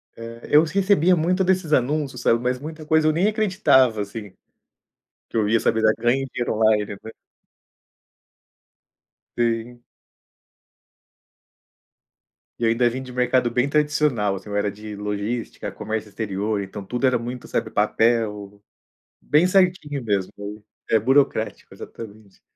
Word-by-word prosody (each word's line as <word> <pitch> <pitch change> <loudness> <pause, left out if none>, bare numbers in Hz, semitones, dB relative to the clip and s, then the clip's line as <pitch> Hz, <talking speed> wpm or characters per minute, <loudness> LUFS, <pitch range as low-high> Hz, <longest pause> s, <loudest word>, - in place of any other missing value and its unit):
É, 115 0 -9
eu 150 +2 +7
recebia 185 0 +3
muito 180 +4 +1
desses 185 -4 +1
anúncios, 135 0 0
sabe, 115 - +3
mas 125 +1 -1
muita 155 +1 -8
coisa 160 0 +3
eu 155 - +5
nem 175 +6 +1
acreditava, 185 - +3
assim, 105 0 -7 1.0
que - - -7
eu 105 -2 +2
ia 115 +2 +3
saber 110 0 0
dar, 110 0 +4
"ganhe 130 +3 +1
dinheiro 120 -2 -2
online", 110 -1 +3 0.2
né. 110 - -8 2.3
Sim. 120 +1 -1 2.8
E 120 - 0
ainda 115 +2 +3
vim 125 +2 -2
de 130 -1 -9
mercado 125 0 +1
bem 125 +3 +1
tradicional 145 -8 +1
assim, 95 +2 -10
eu 100 - -4
era 105 0 0
de 105 +1 -9
logística, 105 +3 -4
comércio 110 -1 -5
exterior, 105 0 -2
então 100 +1 -8
tudo 125 +5 0
era 130 - +2
muito, 120 +1 -7
sabe, - - -2
papel, 105 -3 0 0.6
bem 150 +5 +3
certinho 180 -7 +1
mesmo. 100 -4 -1 0.6
É, 110 - +5
burocrático, 130 -1 +1
exatamente. 110 -3 -12
120 Hz, 135 wpm, -22 LUFS, 110-150 Hz, 2.8 s, eu